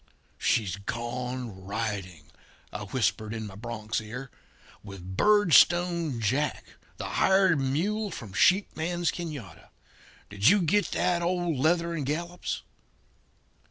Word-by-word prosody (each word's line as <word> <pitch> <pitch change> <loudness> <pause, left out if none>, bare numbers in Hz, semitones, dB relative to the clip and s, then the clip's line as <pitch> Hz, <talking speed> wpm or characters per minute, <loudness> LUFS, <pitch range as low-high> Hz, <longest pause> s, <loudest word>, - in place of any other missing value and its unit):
"'She's 100 -4 +1
gone 120 -1 -5
riding,' 100 -7 -4 0.4
I 105 - -5
whisper 110 -1 -1
in 110 -1 -4
my 100 - -8
bronc's 110 +1 -4
ear, 125 +5 -8 0.5
'with 95 -2 -9
Birdstone 175 - +4
Jack, 130 +7 0 0.3
the - - -5
hired 190 -4 +3
mule 190 +11 0
from 110 - -8
Sheep 190 - +3
Man's 175 +2 -1
Canada. 140 - -7 0.6
Did 100 +2 +1
you 205 -2 +4
get 205 +6 +2
that, 175 -1 +1
old 175 -2 0
Leather 170 +5 +1
and 160 -3 -2
Gallops?' 170 +4 -3
135 Hz, 120 wpm, -28 LUFS, 105-175 Hz, 0.6 s, Birdstone